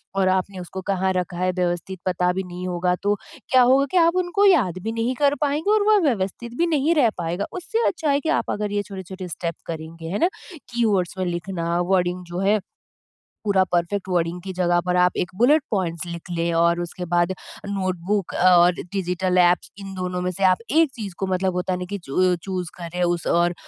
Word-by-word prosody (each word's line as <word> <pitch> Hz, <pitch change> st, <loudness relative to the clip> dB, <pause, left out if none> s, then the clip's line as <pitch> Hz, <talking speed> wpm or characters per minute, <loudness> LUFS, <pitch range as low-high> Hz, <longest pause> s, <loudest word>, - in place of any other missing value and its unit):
और 190 Hz, -1 st, +3 dB
आपने 185 Hz, 0 st, -4 dB
उसको 185 Hz, +2 st, -7 dB
कहाँ 190 Hz, 0 st, +1 dB
रखा 180 Hz, -1 st, -2 dB
है 185 Hz, 0 st, +1 dB
व्यवस्थित 180 Hz, +1 st, -2 dB
पता 180 Hz, -1 st, +1 dB
भी 190 Hz, -, -2 dB
नहीं 180 Hz, 0 st, -6 dB
होगा 180 Hz, 0 st, 0 dB
तो 205 Hz, +1 st, +2 dB, 0.4 s
क्या 255 Hz, -1 st, +6 dB
होगा 265 Hz, +3 st, +5 dB
कि 370 Hz, -, +2 dB
आप 335 Hz, +1 st, +4 dB
उनको 395 Hz, +4 st, +1 dB
याद 245 Hz, -, +4 dB
भी 225 Hz, -, -2 dB
नहीं 230 Hz, +3 st, -1 dB
कर 285 Hz, +1 st, +2 dB
पाएँगे 300 Hz, +7 st, +1 dB
और 425 Hz, -1 st, +3 dB
वो 420 Hz, -, +6 dB
व्यवस्थित 230 Hz, +1 st, -2 dB
भी 340 Hz, -, +2 dB
नहीं 315 Hz, +1 st, +2 dB
रह 250 Hz, -7 st, +4 dB
पाएगा। 175 Hz, +4 st, -2 dB
उससे 435 Hz, +6 st, -1 dB
अच्छा 320 Hz, -4 st, -1 dB
है 280 Hz, -, +3 dB
कि 320 Hz, -, -2 dB
आप -, -, -4 dB
अगर 210 Hz, -1 st, -2 dB
ये 205 Hz, -, 0 dB
छोटे-छोटे 190 Hz, -1 st, -8 dB
स्टेप 170 Hz, 0 st, -4 dB
करेंगे, 165 Hz, 0 st, -7 dB
है 200 Hz, -, -2 dB
ना 345 Hz, -, +3 dB, 0.4 s
कीवर्ड्स 200 Hz, -7 st, +1 dB
में 185 Hz, -, 0 dB
लिखना, 175 Hz, -1 st, -2 dB
वर्डिंग 180 Hz, 0 st, 0 dB
जो 175 Hz, +1 st, -5 dB
है 205 Hz, +2 st, +3 dB, 0.9 s
पूरा 195 Hz, -2 st, +4 dB
परफ़ेक्ट 180 Hz, +3 st, 0 dB
वर्डिंग 175 Hz, -1 st, 0 dB
की 190 Hz, +1 st, -5 dB
जगह 175 Hz, -1 st, +2 dB
पर 180 Hz, 0 st, +1 dB
आप 180 Hz, 0 st, +4 dB
एक 180 Hz, -, -1 dB
बुलेट 280 Hz, +7 st, +4 dB
पॉइंट्स 180 Hz, -4 st, -1 dB
लिख 170 Hz, 0 st, -8 dB
लें 170 Hz, 0 st, -1 dB
और 170 Hz, +1 st, +3 dB
उसके 175 Hz, +1 st, -5 dB
बाद 175 Hz, +1 st, +3 dB, 0.3 s
नोटबुक 190 Hz, 0 st, -2 dB
और 175 Hz, 0 st, +6 dB, 0.2 s
डिजिटल 185 Hz, -1 st, 0 dB
एप्स 175 Hz, 0 st, +2 dB
इन 195 Hz, -1 st, -8 dB
दोनों 180 Hz, -1 st, -3 dB
में 180 Hz, -, 0 dB
से 195 Hz, +3 st, -2 dB
आप 185 Hz, -1 st, +5 dB
एक 320 Hz, 0 st, +4 dB
चीज़ 205 Hz, -5 st, -6 dB
को 195 Hz, -, -1 dB
मतलब 185 Hz, 0 st, 0 dB
होता 180 Hz, +1 st, -1 dB
नहीं 180 Hz, 0 st, -5 dB
कि 200 Hz, +1 st, -4 dB
चु 180 Hz, +3 st, +1 dB
चूज़ 185 Hz, -3 st, -3 dB
करें 175 Hz, +1 st, -4 dB
उस 175 Hz, -1 st, 0 dB
और 175 Hz, +1 st, +2 dB
185 Hz, 210 wpm, -23 LUFS, 175-210 Hz, 0.9 s, क्या